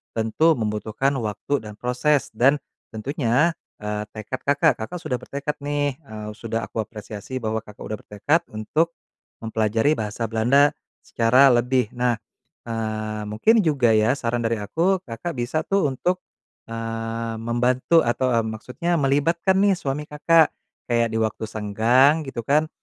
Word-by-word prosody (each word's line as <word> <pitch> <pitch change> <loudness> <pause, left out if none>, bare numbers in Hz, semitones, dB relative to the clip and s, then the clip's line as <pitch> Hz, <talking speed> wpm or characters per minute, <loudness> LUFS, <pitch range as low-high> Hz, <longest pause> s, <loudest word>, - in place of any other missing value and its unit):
tentu 115 +9 +3
membutuhkan 110 +3 -1
waktu 110 +6 -2
dan 105 - -8
proses 125 +4 +1
dan 130 +6 +5 0.4
tentunya, 130 +6 +1 0.3
eee, 105 0 -3
tekad 110 +4 -6
Kakak, 140 0 +4
Kakak 145 +11 -5
sudah 155 -7 -2
bertekad 140 +4 -4
nih, 145 -1 0
eee, 110 -8 -8
sudah 115 0 -3
aku - - -6
apresiasi 110 +3 -7
bahwa 110 -1 -1
Kakak 105 -2 -15
udah 110 - -4
bertekad 125 +11 0
untuk 155 +11 0 0.5
mempelajari 110 +3 +1
bahasa 110 +2 -3
Belanda 130 +6 +4 0.3
secara 125 +4 +4
lebih. 125 0 +2
Nah, 120 -1 +1 0.5
eee, 110 -1 -3
mungkin 215 - +3
juga 140 -7 +3
ya 110 +3 +3
saran 120 -3 -1
dari 115 0 +1
aku, 170 - +1
Kakak 125 +9 -5
bisa 125 +6 -1
tuh 195 -6 +2
untuk, 180 +7 -1 0.5
eee, 115 0 -4
membantu 125 +7 +2
atau, 130 +2 +1
eee, 115 - +2
maksudnya 125 +10 -3
melibatkan 165 +7 +2
nih 200 0 +4
suami 145 -3 -3
Kakak. 155 +2 +3 0.3
Kayak 115 -1 +2
di 110 - 0
waktu 110 0 -1
senggang 115 +9 +3
gitu 120 -3 -5
kan, 150 +5 +2
120 Hz, 145 wpm, -23 LUFS, 110-145 Hz, 0.5 s, dan